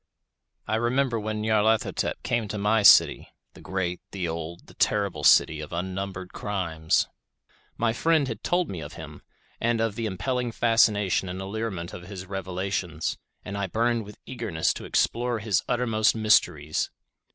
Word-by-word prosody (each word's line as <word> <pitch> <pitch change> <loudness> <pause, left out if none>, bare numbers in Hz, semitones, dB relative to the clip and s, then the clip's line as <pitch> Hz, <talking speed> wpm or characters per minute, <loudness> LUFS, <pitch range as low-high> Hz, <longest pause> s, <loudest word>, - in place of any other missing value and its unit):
I 110 - +1
remember 120 +1 +1
when 105 0 -3
Nyarlathotep 110 0 +1
came 115 -3 0
to 105 - -4
my 105 +2 +2
city—the 100 - +4
great, 90 -2 -3
the 95 -3 -3
old, 80 +1 -6
the - - -16
terrible 100 -8 0
city 80 +2 +5
of 75 - -8
unnumbered 95 +1 -4
crimes. 85 -6 0 0.7
My 115 -1 +1
friend 160 +2 +2
had 115 - -5
told 175 0 +1
me 90 -4 -6
of 75 - -8
him, - - -10 0.4
and 120 0 +1
of 115 -2 0
the 115 +1 -3
impelling 120 +5 -2
fascination 105 -6 +3
and 90 +1 -5
allurement 95 -3 -4
of 90 0 -9
his 95 -2 -7
revelations, 95 -3 -3 0.3
and 100 - -5
I 100 -1 -2
burned 115 +3 0
with 105 0 -12
eagerness 90 -10 -1
to - - -8
explore 120 0 +1
his 105 -2 +1
uttermost 115 -3 +2
mysteries. 80 -9 +2
105 Hz, 150 wpm, -26 LUFS, 90-115 Hz, 0.7 s, city